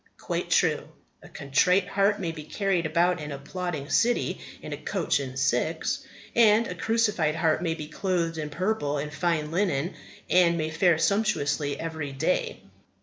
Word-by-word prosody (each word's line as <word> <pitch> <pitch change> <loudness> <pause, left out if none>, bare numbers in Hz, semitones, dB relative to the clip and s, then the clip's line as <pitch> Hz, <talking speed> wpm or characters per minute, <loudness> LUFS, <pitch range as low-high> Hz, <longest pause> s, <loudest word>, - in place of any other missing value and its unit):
Quite - - -3
true. - - +2 0.3
A - - -14
contrite 180 +8 +2
heart 200 +1 +2
may 175 -4 -2
be 155 -2 -8
carried 180 0 0
about 175 +2 +2
an 150 0 -6
applauding 150 +1 -5
city 240 +1 +1 0.2
in - - -7
a - - -4
coach - - -1
and 130 -2 -6
six; 135 - 0 0.4
and 225 -1 +5
a 180 - -4
crucified 210 -5 +1
heart 160 -1 +1
may 165 -2 -1
be 155 -2 -7
clothed 165 -1 -1
in 150 -1 -3
purple 170 -3 -1
and 150 +1 -4
fine 155 -2 0
linen, 175 -3 0 0.3
and 175 -2 +4
may 155 -1 -2
fare 170 0 +3
sumptuously 160 -7 0
every 160 -4 -4
day. 160 +7 -1
165 Hz, 160 wpm, -26 LUFS, 150-185 Hz, 0.4 s, and